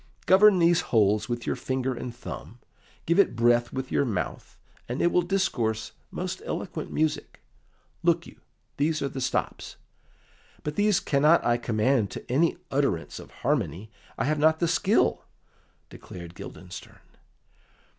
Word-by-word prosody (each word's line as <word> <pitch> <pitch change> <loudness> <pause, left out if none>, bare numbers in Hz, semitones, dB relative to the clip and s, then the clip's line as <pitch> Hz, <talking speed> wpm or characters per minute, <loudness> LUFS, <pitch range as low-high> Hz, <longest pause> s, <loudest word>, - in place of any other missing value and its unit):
"Govern 200 +1 +6
these 170 0 +4
holes 105 +1 +2
with 120 -1 -3
your - - -1
finger 130 +1 -2
and 125 0 -6
thumb, 120 -1 -9 0.5
give 170 +4 +2
it 200 - +4
breath 120 +1 +3
with 130 0 -5
your - - +2
mouth, 100 - -4 0.3
and 125 - -3
it 175 - +3
will 180 - +3
discourse 170 - -1 0.2
most - - -4
eloquent - - -5
music. 155 0 -1 0.6
Look 170 0 +2
you, - - -14 0.4
these 155 +1 0
are 140 - -1
the 135 0 -6
stops." 125 - -2 0.9
"But 150 0 -4
these 205 -1 +3
cannot 150 +4 +3
I 120 0 +3
command 115 -1 +1
to - - -8
any 160 +7 +2
utterance 135 - -1
of - - -11
harmony; 110 - -2 0.3
I 115 - 0
have 155 +2 0
not 160 +1 +4
the 170 - +1
skill," - - +2 0.7
declared 85 -2 -10
Guildenstern. 90 0 -10
130 Hz, 145 wpm, -26 LUFS, 115-160 Hz, 0.9 s, Govern